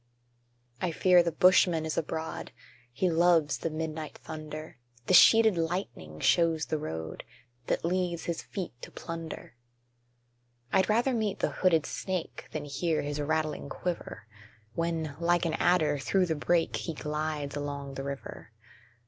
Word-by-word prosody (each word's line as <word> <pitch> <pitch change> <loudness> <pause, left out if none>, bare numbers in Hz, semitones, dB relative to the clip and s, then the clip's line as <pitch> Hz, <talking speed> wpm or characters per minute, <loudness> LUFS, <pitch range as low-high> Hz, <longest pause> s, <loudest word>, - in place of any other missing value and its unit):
I 180 - +1
fear 180 +2 +5
the 170 0 0
Bushman 175 -2 +4
is 160 - -2
abroad 160 0 -4 0.4
He 145 +10 0
loves 165 -5 +3
the 165 - -2
midnight 155 -1 -5
thunder; 155 -3 -8 0.3
The - - +1
sheeted 220 0 +7
lightning 160 - -3
shows 165 - +3
the 155 - -2
road 80 - -5 0.4
That - - 0
leads 175 -1 -1
his 170 -1 -3
feet 185 - -6
to - - -8
plunder: 165 -6 -7 1.2
I'd 190 - +3
rather 240 +5 +3
meet 215 -4 -1
the - - 0
hooded 165 -5 +2
snake 185 -3 -4
Than 150 -1 -4
hear 155 +3 -1
his 145 +1 -3
rattling 155 -1 -1
quiver, 175 -7 -5 0.5
When, 165 -3 -2
like 170 0 +2
an 165 - 0
adder, 155 -4 +2
through 185 +7 +2
the 165 - 0
brake, 165 +3 +1
He 165 - -4
glides 150 -1 -3
along 140 -1 -4
the 135 - -5
river. 140 -4 -7
160 Hz, 145 wpm, -29 LUFS, 150-175 Hz, 1.2 s, sheeted